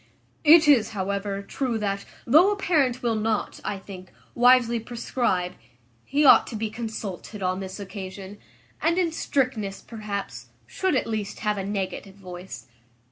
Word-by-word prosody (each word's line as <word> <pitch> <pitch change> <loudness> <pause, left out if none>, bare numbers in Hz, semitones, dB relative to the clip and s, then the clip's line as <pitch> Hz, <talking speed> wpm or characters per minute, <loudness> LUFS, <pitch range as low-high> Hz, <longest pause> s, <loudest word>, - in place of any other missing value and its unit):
"It 320 0 +7
is, 225 -7 +4
however, 200 +1 -2
true 245 +2 -2
that, 200 -2 -2 0.2
though 320 - +6
a - - 0
parent 280 -11 +1
will 235 -1 +1
not, 220 -1 -1
I 205 - -3
think, 190 -1 -11 0.2
wisely 245 -1 +5
prescribe, 225 -6 -1 0.5
he 290 +2 +1
ought - - +7
to 235 - -6
be 215 0 -3
consulted 215 -3 -6
on 185 0 0
this 190 +1 -7
occasion; 195 0 -8 0.4
and, 335 +2 +2
in 350 -3 +2
strictness, 245 -10 -1
perhaps, 210 -3 -6 0.2
should 375 -5 -1
at - - +1
least 215 -3 -4
have 210 -2 0
a - - -3
negative 195 -1 -4
voice. 185 -1 -9
215 Hz, 150 wpm, -25 LUFS, 195-250 Hz, 0.5 s, It